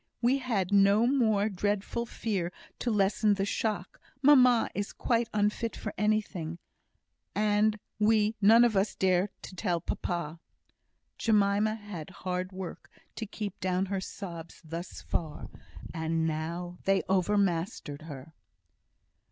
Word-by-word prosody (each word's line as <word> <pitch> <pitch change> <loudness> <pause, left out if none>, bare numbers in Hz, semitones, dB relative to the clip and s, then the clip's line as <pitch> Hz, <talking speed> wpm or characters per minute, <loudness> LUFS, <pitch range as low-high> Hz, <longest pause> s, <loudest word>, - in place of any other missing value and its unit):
We 250 +3 +3
had 210 -8 -1
had - - 0
no 200 +3 +5
more 220 -6 +3
dreadful 205 +3 -1
fear 195 -7 -2 0.3
to 245 - -1
lessen 210 0 +3
the 195 0 0
shock; 205 -2 -2 0.2
mamma 255 -4 +6
is 205 0 -3
quite 235 -1 0
unfit 210 +2 0
for 215 - -5
anything, 200 -5 -1 0.8
and 210 +1 +2 0.2
we 215 0 +3
none 225 +4 +7
of 235 -3 +3
us 195 +1 +1
dare 185 +1 +2
to 185 - -9
tell 175 -3 0
papa." 170 -1 -3 0.8
Jemima 210 0 +3
had 205 -7 -8
hard 185 0 -4
work 185 -2 -7 0.3
to 220 - -5
keep 205 -1 -6
down 185 +1 0
her 195 0 -2
sobs 170 -4 -8
thus 165 +3 -7
far, 155 -3 -4 0.4
and 160 -1 0
now 170 +3 -3
they 195 0 +3
overmastered 185 -5 0
her. 150 -1 -9
200 Hz, 130 wpm, -29 LUFS, 175-215 Hz, 0.8 s, none